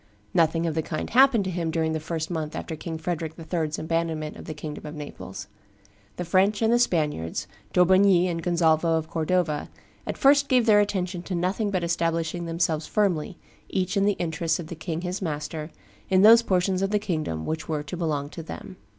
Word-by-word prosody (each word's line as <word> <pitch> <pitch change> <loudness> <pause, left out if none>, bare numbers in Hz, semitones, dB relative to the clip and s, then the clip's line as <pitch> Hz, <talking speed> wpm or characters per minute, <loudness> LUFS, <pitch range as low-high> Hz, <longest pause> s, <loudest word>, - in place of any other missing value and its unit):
Nothing 165 0 +2
of 165 - 0
the 160 - 0
kind 155 0 -4
happened 260 -4 +5
to 190 - -3
him 170 -2 -2
during 160 0 0
the 160 - -1
first 160 +1 -4
month 160 -2 -3
after 160 - -4
King 160 +1 -5
Frederick 160 -1 -3
III.'s 160 -2 -2
abandonment 160 -1 -2
of - - -10
the 155 - -6
kingdom 150 0 -7
of 150 - -7
Naples. 100 -10 -8 0.7
The 180 - -4
French 195 +5 +2
and 225 +1 +4
the 240 - +4
Spaniards, 150 - 0 0.3
D'Aubigny 185 0 +5
and 165 -2 -2
Gonzalvo 165 -1 +2
of 160 0 -3
Cordova, 160 -2 0 0.4
at - - -3
first 280 0 +5
gave 250 -3 +4
their 210 -2 +6
attention 185 -3 -1
to 180 +1 -4
nothing 185 +5 0
but 185 -3 -1
establishing 165 0 -1
themselves 165 -2 -1
firmly, 185 -5 0 0.3
each 185 +2 -1
in 200 0 +3
the 205 - +3
interests 165 -2 -1
of 165 -2 -7
the 170 - -5
king 160 +1 -4
his 180 +2 -4
master, 150 -1 -4 0.4
in 190 0 +4
those 230 +2 +9
portions 185 -3 +1
of 195 - +1
the 210 - +2
kingdom 155 - -3
which 160 0 -4
were 150 -2 -1
to 150 - -6
belong 150 -4 -2
to 165 - -8
them. 185 +3 -9
170 Hz, 200 wpm, -25 LUFS, 160-185 Hz, 0.7 s, those